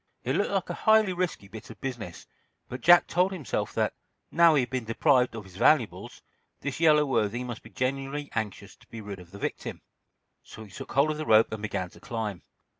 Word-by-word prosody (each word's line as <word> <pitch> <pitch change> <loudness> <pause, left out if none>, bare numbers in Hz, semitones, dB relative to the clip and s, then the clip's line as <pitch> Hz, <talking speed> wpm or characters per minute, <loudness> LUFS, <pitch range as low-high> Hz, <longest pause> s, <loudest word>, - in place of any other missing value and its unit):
It - - -1
looked - - +1
like - - -1
a - - -8
highly 220 -3 +5
risky 175 - -3
bit 105 +1 -11
of - - -12
business, 120 -10 -6 0.4
but 125 0 -7
Jack 175 +4 +7
told 180 +2 +1
himself 175 -9 -3
that, - - +1 0.4
now 170 -2 +6
he 140 - +4
had 125 - -7
been 130 -2 -2
deprived 125 +1 +2
of 110 - -6
his 95 -1 -14
valuables, 125 -1 +1 0.4
this 140 +1 -4
yellow 155 -2 +5
worthy 120 -2 0
must 120 -3 -6
be 115 - -14
genuinely 135 +5 -3
anxious 110 -3 -4
to - - -23
be 115 - -9
rid 100 -3 -7
of 90 -1 -14
the 100 - -11
victim. - - -5 0.6
So 110 - -12
he 105 - -14
took - - -9
hold 140 +3 +3
of 150 - -4
the 155 - -4
rope 110 0 +5
and 110 -1 -5
began 95 -4 -3
to - - -16
climb. 110 -5 -4
125 Hz, 215 wpm, -27 LUFS, 110-150 Hz, 0.6 s, Jack